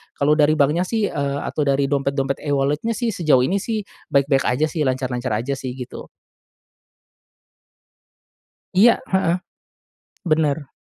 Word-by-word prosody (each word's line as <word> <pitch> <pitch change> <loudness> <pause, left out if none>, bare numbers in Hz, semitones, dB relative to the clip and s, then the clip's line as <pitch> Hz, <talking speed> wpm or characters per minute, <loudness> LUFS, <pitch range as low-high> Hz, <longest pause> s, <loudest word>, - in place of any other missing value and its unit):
kalau 145 +2 +2
dari 150 +1 +4
banknya 155 +5 +2
sih, 220 -3 0
eee, 140 0 -2
atau - - -3
dari 140 0 +2
dompet-dompet 140 -1 -1
e-wallet-nya 145 +9 0
sih 235 -1 -1
sejauh 155 -9 +3
ini 190 +9 +1
sih 220 -1 -3 0.3
baik-baik 140 -1 +2
aja 125 +5 +2
sih 150 -5 -1
lancar-lancar 130 -2 -2
aja 120 +6 -2
sih 130 -2 -6
gitu. 125 -2 -8 2.7
Iya, 225 +5 +6
heeh. 190 -2 +1 0.9
Bener. 155 -3 0
145 Hz, 130 wpm, -21 LUFS, 135-170 Hz, 2.7 s, Iya